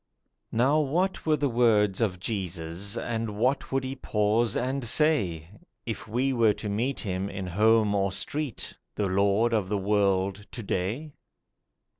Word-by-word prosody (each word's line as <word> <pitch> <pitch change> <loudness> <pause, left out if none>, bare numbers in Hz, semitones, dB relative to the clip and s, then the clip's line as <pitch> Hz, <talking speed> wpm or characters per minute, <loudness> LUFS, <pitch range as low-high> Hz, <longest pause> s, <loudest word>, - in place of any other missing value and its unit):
NOW 135 +7 +3
what 170 +6 0
were 155 -1 +4
the 145 - +1
words 110 -5 +3
of 95 -5 0
Jesus, 95 0 -4
And 115 -3 -3
what 130 +5 0
would 135 0 0
He 130 +1 -4
pause 110 -2 +1
and 130 +2 -1
say, 110 - +2 0.4
If 110 -3 -5
we 125 +5 0
were 115 -4 +4
to 105 - -6
meet 120 +6 -1
in 95 0 -3
home 105 +3 +3
or 100 -1 +1
street, 140 +7 -3 0.2
The 105 - 0
Lord 100 +4 +2
of 105 -4 0
the 105 - 0
world 100 0 +1
to 120 - -5
day? 110 +12 -2
110 Hz, 150 wpm, -27 LUFS, 100-125 Hz, 0.4 s, were